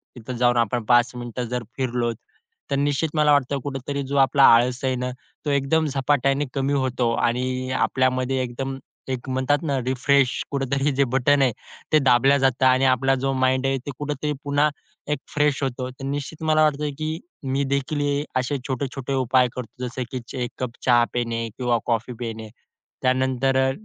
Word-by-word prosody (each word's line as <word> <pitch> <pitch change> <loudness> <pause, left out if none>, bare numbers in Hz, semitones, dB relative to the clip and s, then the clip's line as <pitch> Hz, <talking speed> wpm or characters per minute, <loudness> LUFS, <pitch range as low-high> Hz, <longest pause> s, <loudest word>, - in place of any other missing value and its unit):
तिथं 125 +1 -7
जाऊन 120 0 +3
आपण 120 0 +1
5 120 +1 +4
मिनिटं 120 0 -5
जर 125 0 -2
फिरलोत, 120 -3 -1 0.6
तर - - +2
निश्चित 145 +3 0
मला 150 -1 +4
वाटतं 140 -1 +2
कुठेतरी 140 +1 -4
जो 140 +1 -1
आपला 135 +1 +4
आळस 125 +2 +1
आहे 130 -1 +1
ना 125 0 -2 0.4
तो - - 0
एकदम 140 +3 +2
झपाट्याने 140 0 +1
कमी 135 0 0
होतो 130 -3 0
आणि 130 +2 -1
आपल्यामध्ये 130 0 +1
एकदम 135 +2 -4 0.3
एक 130 0 -4
म्हणतात 130 +3 +1
ना 140 -4 0
रिफ्रेश 130 +1 +2 0.2
कुठेतरी 140 +1 0
जे 140 - +4
बटन 140 +2 +3
आहे, 130 -2 +4 0.4
ते 155 - +6
दाबल्या 135 +1 +4
जातं 130 -1 +2
आणि 130 +1 +4
आपला 135 +1 +3
जो 135 - +1
माइंड 130 0 +1
आहे 135 0 +1
ते 145 - -4
कुठेतरी 150 0 -2
पुन्हा 145 +1 +2 0.4
एक 150 - 0 0.2
फ्रेश 150 -2 +2
होतो. 130 -1 -2
तर 130 +1 -12
निश्चित 145 +3 -4
मला 155 0 +4
वाटतं 150 0 +1
की 155 +1 -2 0.2
मी 135 +1 0
देखील 140 +2 -1
हे 145 0 0 0.2
असे 130 +3 -1
छोटे-छोटे 135 0 -3
उपाय 130 -1 +3
करतो 125 0 -6
जसं 125 +1 -4
की 130 - -3
चे 125 - -4
एक 120 - -4
कप 125 -2 -2
चहा 120 -2 +5
पिणे 115 -1 -1
किंवा 120 -2 +1
कॉफी 115 +1 -1
पिणे, 110 -2 -5 0.5
त्यानंतर 130 0 +1
अ, - - +1
130 Hz, 180 wpm, -23 LUFS, 125-140 Hz, 0.6 s, ते